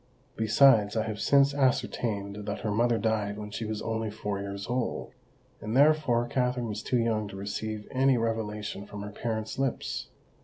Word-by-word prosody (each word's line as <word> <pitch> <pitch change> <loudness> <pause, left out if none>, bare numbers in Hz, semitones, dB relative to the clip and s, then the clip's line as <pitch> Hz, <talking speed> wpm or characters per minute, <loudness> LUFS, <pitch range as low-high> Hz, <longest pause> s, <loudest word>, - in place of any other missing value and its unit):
Besides, 110 -1 +5
I 110 - +2
have 110 -2 -4
since 140 0 +4
ascertained 105 -6 -1
that - - -3
her 110 - -1
mother 115 +2 +2
died 105 -1 0
when 105 0 -7
she 110 +1 -4
was 110 -1 -3
only 110 -1 -2
four 105 -1 -4
years 100 0 -5
old; 125 -1 -2 0.5
and 110 +4 -1
therefore 145 -5 +4
Katherine 125 -2 0
was 105 0 -4
too 125 - 0
young 110 -2 +1
to 100 - -9
receive 105 +2 -4
any 130 0 +3
revelation 105 -3 -3
from 105 0 -7
her 105 - -6
parent's 110 +1 -3
lips. 135 -2 -2
110 Hz, 170 wpm, -28 LUFS, 105-120 Hz, 0.5 s, Besides